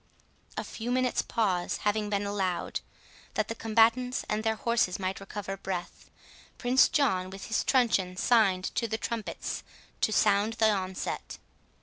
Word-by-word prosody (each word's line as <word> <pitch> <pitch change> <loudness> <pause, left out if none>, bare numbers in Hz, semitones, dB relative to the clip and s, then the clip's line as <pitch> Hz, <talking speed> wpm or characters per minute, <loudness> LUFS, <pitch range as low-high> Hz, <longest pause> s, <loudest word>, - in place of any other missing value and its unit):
A - - -1
few 230 +1 -6
minutes 255 0 +2
pause 185 -6 0
having 210 0 +1
been 205 0 0
allowed, 195 -3 -1 0.6
that 215 -1 0
the - - -1
combatants 230 +3 +2
and 215 +1 -1
their 220 0 +1
horses 235 -5 +1
might 190 0 -3
recover 195 0 -6
breath, 185 -2 -5 0.5
Prince 250 +1 +4
John 190 -11 +1
with 195 0 -8
his 225 - +1
truncheon 200 -8 +2
signed 195 -5 +3
to 230 - 0
the 220 - -2
trumpets 225 -1 -4 0.4
to - - +3
sound 210 +1 +3
the 220 -1 +3
onset. 190 -2 -3
215 Hz, 145 wpm, -29 LUFS, 190-230 Hz, 0.6 s, Prince